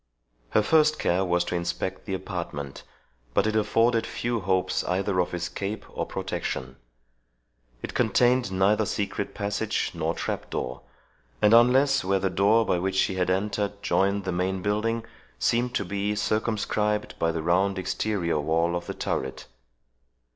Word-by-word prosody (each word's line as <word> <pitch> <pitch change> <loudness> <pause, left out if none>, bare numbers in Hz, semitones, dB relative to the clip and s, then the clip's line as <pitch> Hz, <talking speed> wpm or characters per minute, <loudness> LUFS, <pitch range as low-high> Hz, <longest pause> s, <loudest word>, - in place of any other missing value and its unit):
Her 110 - +3
first 155 +4 +4
care 90 +2 +1
was 90 -1 +1
to 90 - -3
inspect 85 +2 -3
the 95 - -1
apartment; 85 -7 -5 0.5
but - - +3
it 110 0 0
afforded 115 +2 +2
few 120 -1 -2
hopes 95 -1 0
either 95 +1 0
of 90 - +1
escape 95 +5 -4
or - - -3
protection. 65 +1 -4 1.1
It - - -5
contained 125 0 +3
neither 100 +3 +2
secret 100 -1 -3
passage 100 0 -1
nor - - -1
trap - - -4
door, 65 - -4 0.6
and 105 +1 +5
unless 130 +4 +5
where 95 +1 +2
the 95 0 -1
door 105 +4 +4
by 90 - +1
which 95 +1 -1
she 95 - +2
had 90 -1 0
entered 100 +1 -1
joined 100 +1 +1
the 95 - -2
main 90 +1 -1
building, 115 +2 0 0.3
seemed 120 - +1
to 100 - 0
be 100 +3 -1
circumscribed 105 0 -1
by 80 - +2
the 80 -1 -3
round 95 +4 +2
exterior 95 -4 -1
wall 85 +3 +1
of 85 - -4
the - - -4
turret. 65 0 -3
100 Hz, 155 wpm, -26 LUFS, 90-110 Hz, 1.1 s, and